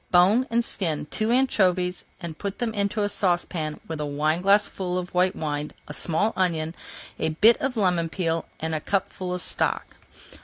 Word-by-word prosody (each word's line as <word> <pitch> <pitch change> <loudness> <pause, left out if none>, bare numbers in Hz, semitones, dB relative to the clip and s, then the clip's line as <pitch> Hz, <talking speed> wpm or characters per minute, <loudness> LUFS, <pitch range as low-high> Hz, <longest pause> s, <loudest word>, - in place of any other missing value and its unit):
Bone 195 +9 +5
and 235 +1 +2
skin 165 -10 -1
two 215 +1 0
anchovies 185 -8 +2
and 170 -2 -6
put 200 -1 -4
them 235 -2 -2
into 205 0 0
a - - +2
saucepan 175 -5 -1
with 160 -2 -4
a - - 0
wineglassful 180 +5 +1
of 180 -1 -4
white 180 +1 +3
wine, 150 -1 -3
a 150 - -6
small 180 +8 +1
onion, 165 -4 0 0.5
a - - +1
bit 215 +9 +6
of 265 -3 -2
lemon 180 -5 +2
peel, 165 -2 -1
and 160 0 -2
a 155 - 0
cupful 185 -1 -2
of 180 -1 -2
stock. - - -1
180 Hz, 170 wpm, -25 LUFS, 160-205 Hz, 0.5 s, bit